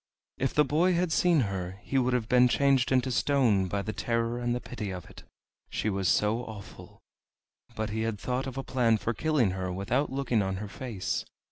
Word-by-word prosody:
If 135 -1 -1
the 150 - +5
boy 165 +7 +2
had 175 -1 0
seen 170 -3 +3
her 95 -3 -3
he 135 - 0
would 125 0 +1
have 120 -3 0
been 125 0 +5
changed 135 0 +2
into 130 0 +2
stone 120 -7 +2
by 100 +2 -2
the 110 - -4
terror 115 0 -1
and 120 0 0
the - - -2
pity 115 -5 -6
of 90 -3 -6
it, - - -13 0.5
she 105 - -1
was 95 -1 -1
so 105 +6 +2
awful; 100 -4 -11 0.7
but 110 -1 -3
he 110 +1 -2
had 110 -1 -1
thought 130 +4 -2
of 130 0 -6
a 135 - -2
plan 120 -4 +2
for 115 +2 -2
killing 135 -4 +1
her 95 -1 -3
without 115 +11 -1
looking 130 -5 0
on 95 -1 -1
her 105 +2 -5
face. 105 -2 -3
120 Hz, 210 wpm, -28 LUFS, 100-130 Hz, 0.7 s, the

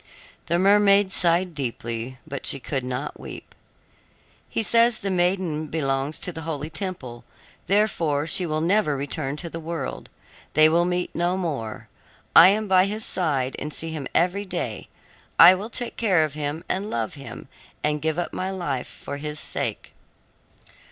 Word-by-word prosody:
The 170 - +2
mermaid 200 +1 +5
sighed 175 0 +2
deeply, 120 -2 -4
but 140 - -5
she 140 - +7
could 135 0 -3
not 125 +2 -4
weep. - - -10 1.0
"He 225 - -1
says 230 +1 +4
the 195 - -3
maiden 175 -4 0
belongs 140 -1 -1
to 180 - -3
the 160 - -7
holy 155 -1 -4
temple, 135 - -5 0.4
therefore 170 -8 +1
she 175 +2 0
will 155 0 -1
never 170 -4 +2
return 140 +1 -3
to 170 - -5
the 165 0 -6
world 165 -3 -5 0.4
they 155 +1 +7
will 170 +2 +3
meet 180 0 -2
no 175 +2 0
more. 140 -12 -4 0.5
I 170 - +11
am 210 +2 +2
by 185 -1 +5
his 215 +2 -3
side 140 -7 -1
and 150 - -5
see 165 +2 -4
him 150 -4 -4
every 180 +4 +2
day. 190 - -5 0.5
I 170 +2 +10
will 200 +4 -4
take 240 0 -5
care 190 -8 +3
of 155 -2 -2
him, 150 +2 -3
and 200 +3 -2
love 115 - -2
him, 140 -1 -10 0.4
and 150 0 0
give 160 +1 0
up 175 - -3
my 185 - -2
life 160 -10 -3
for 145 - -8
his 150 +1 -5
sake." - - -4
165 Hz, 165 wpm, -24 LUFS, 145-185 Hz, 1.0 s, I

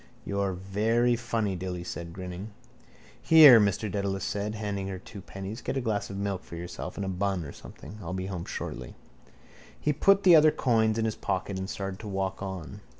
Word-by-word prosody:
—You're 100 -1 -1
very 110 +6 +1
funny, 115 -4 -1
Dilly 90 -1 -4
said, 85 -1 -6
grinning. 90 +3 -7 0.7
—Here, 150 -7 +9
Mr 100 -2 +2
Dedalus 100 -1 -2
said, 105 +2 -2
handing 100 -2 -3
her 95 -1 -4
two 100 +2 -11
pennies. 100 +5 -7
Get 135 - -3
a - - +2
glass 105 -5 -2
of 100 - -6
milk 100 -2 -2
for - - -10
yourself 85 +1 -6
and 100 - -2
a - - -4
bun 95 -2 -1
or - - -7
a - - -9
something. 110 - -11
I'll 85 - -6
be 95 0 -3
home 90 -3 -5
shortly. 60 -2 -6 0.8
He 150 - +1
put 195 +7 +4
the 180 -3 +8
other 155 0 +7
coins 110 -6 +2
in 115 - +1
his 110 - -1
pocket 95 0 -2
and 95 +1 -4
started 95 -1 -5
to 110 - -8
walk 95 -1 -2
on. 95 +1 -6
100 Hz, 205 wpm, -28 LUFS, 95-110 Hz, 0.8 s, Here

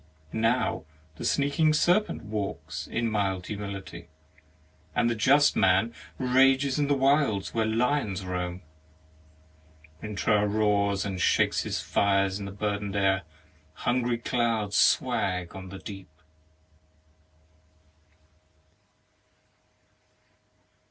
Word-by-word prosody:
Now 115 -3 0 0.3
the - - -7
sneaking 155 +2 +2
serpent 175 +7 +2
walks 80 -8 -5
In 115 0 -1
mild 95 -3 -1
humility; 100 -4 -7 0.9
And 120 - +2
the - - -1
just 140 +6 +4
man 95 +5 +3 0.2
rages 135 +2 +3
in 145 - +1
the 145 - +2
wilds 135 -7 +1
Where 110 -1 +1
Uons 110 -4 0
roam. 90 0 -4 1.4
Rintrah 105 0 +1
roars 100 -2 +1
and 95 -3 -4
shakes - - +2
his - - -3
fires 100 -1 +1
in 100 - -6
the 100 - -6
burdened 100 0 -3
air, 95 -1 +2 0.6
Hungry 120 -1 +1
clouds 115 -4 -1
swag 90 -2 +1
on 95 -1 -8
the 95 - -8
deep. 95 -1 -9
105 Hz, 100 wpm, -27 LUFS, 95-125 Hz, 1.4 s, just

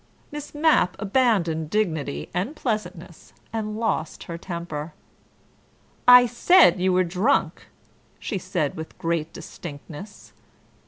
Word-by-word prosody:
Miss 295 0 -8
Mapp 295 - +3
abandoned 195 - +1
dignity 160 - -1
and 195 - -2
pleasantness, 185 - -5 0.2
and 215 -1 -3
lost 220 -8 -2
her 170 - -7
temper. 170 -3 -6 1.1
"I 250 0 +9
said 290 - +5
you 185 0 +2
were 185 0 +3
drunk," 185 +10 0 0.5
she 200 - -4
said 175 -5 -2
with 160 -2 -8
great 165 -1 -2
distinctness. 150 +7 -10
185 Hz, 110 wpm, -24 LUFS, 165-225 Hz, 1.1 s, I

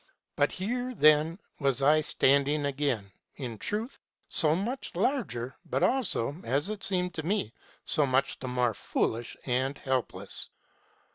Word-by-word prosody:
"Here, 245 +6 -3
then, 155 +1 +5 0.2
was 135 -1 +2
I 155 +2 +5
standing 145 +1 +3
again, 140 -6 0 0.3
ŌĆö 135 - -4
in 115 -3 -5
truth, 220 - -3 0.3
so 155 -3 +3
much 235 +9 -2
the 175 - -5
larger, 180 - -1
but 130 - -1
also, 190 - +1
as 140 - 0
it 210 -2 -6
seemed 180 -2 0
to 160 - -4
me, 165 - -1 0.3
so 150 -3 +2
much 135 +1 +1
the 130 - -5
more 125 -2 +1
stupid 115 +3 -2
and 130 +2 0
helpless. 130 -2 -3
145 Hz, 145 wpm, -29 LUFS, 130-185 Hz, 0.3 s, then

